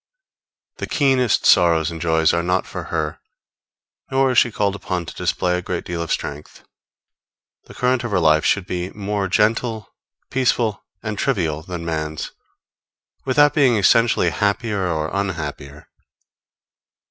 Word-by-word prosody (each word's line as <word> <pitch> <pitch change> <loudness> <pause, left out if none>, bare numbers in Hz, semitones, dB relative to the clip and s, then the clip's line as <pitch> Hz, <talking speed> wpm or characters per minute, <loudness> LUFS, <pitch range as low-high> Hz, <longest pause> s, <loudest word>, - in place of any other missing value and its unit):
The - - -5
keenest 130 -6 +2
sorrows 85 -2 +4
and 80 -1 -7
joys 80 -1 +2
are 85 - +1
not 90 +2 0
for - - -7
her, - - -3 0.9
nor 135 0 +2
is 125 - +5
she 120 - +2
called 100 -2 0
upon 90 -3 -4
to - - -8
display 90 -1 -1
a 90 - -2
great 90 -1 -4
deal 85 -1 -4
of 85 - -4
strength. 75 +1 -5 1.0
The - - -14
current 125 0 +1
of 120 - -3
her 100 -4 +1
life 80 -2 +4
should 100 -3 +1
be 90 0 -3
more 100 -1 -2
gentle, 110 +2 0 0.4
peaceful 120 -5 0 0.2
and 105 -2 -4
trivial 85 - 0
than 85 -1 -7
man's, 80 -1 -3 0.9
without 145 +2 +4
being 135 -6 +4
essentially 115 +3 +3
happier 100 -1 -1
or 80 -2 -2
unhappier. 75 -7 -4
95 Hz, 145 wpm, -21 LUFS, 85-115 Hz, 1.0 s, is